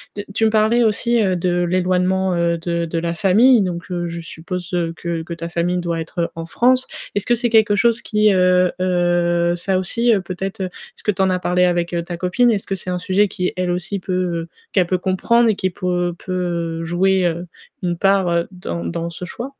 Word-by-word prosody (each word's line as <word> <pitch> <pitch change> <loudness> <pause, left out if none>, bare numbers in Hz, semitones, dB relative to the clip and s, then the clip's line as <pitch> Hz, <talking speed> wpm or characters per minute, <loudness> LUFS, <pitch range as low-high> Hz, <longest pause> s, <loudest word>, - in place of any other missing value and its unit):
tu 205 - -5
tu 225 +2 +2
me - - +4
parlais 220 +2 +3
aussi, 235 +2 +2
heu, 185 -2 +1
de 175 0 0
l'éloignement, 185 +1 +1
heu, 170 0 +1
de 170 0 -2
de 165 0 -2
la 170 0 -2
famille 215 +7 +5
donc 180 -2 -3
heu, 175 -1 -2
je 170 0 -5
suppose 175 +2 -7 0.3
que 170 -1 -3
que 170 - -6
ta 170 0 -6
famille 175 +1 -1
doit 170 -2 -2
être 170 +1 -3
en 165 0 -5
France. 255 +8 +2 0.3
Est-ce 205 - -1
que 240 - +3
c'est 240 0 0
quelque 220 -2 +4
chose 235 +2 +2
qui, 210 -1 +2
heu 180 -1 +3
heu, 175 -1 +1
ça 185 +2 0
aussi, 235 +6 +1
heu, 195 - +1
peut-être 190 +2 -5
est-ce 185 -1 -8
que 210 - +2
tu 195 - -3
en 190 - +3
as 185 - 0
parlé 180 0 +1
avec 175 -1 0
ta 175 -1 -5
copine? 185 +8 +2
Est-ce 200 -3 -1
que 195 - -2
c'est 185 - -6
un 180 - -1
sujet 190 +3 +2
qui, 180 -1 -3
elle 185 -1 -1
aussi 180 +3 -2
peut 180 -3 -2 0.3
qu'elle 185 -3 +3
peut 185 +1 +1
comprendre 225 +6 +2
et 215 - +2
qui 190 -1 -1
pour 180 0 -3
heu, 175 -1 -1
peut 170 -3 -3
jouer, 185 +2 +2
heu, 170 +1 -3 0.4
une 175 -1 -1
part 180 -3 +2
dans 85 - -5
dans 165 - -3
ce 170 +2 -7
choix? 245 +9 -7
180 Hz, 215 wpm, -20 LUFS, 170-195 Hz, 0.4 s, famille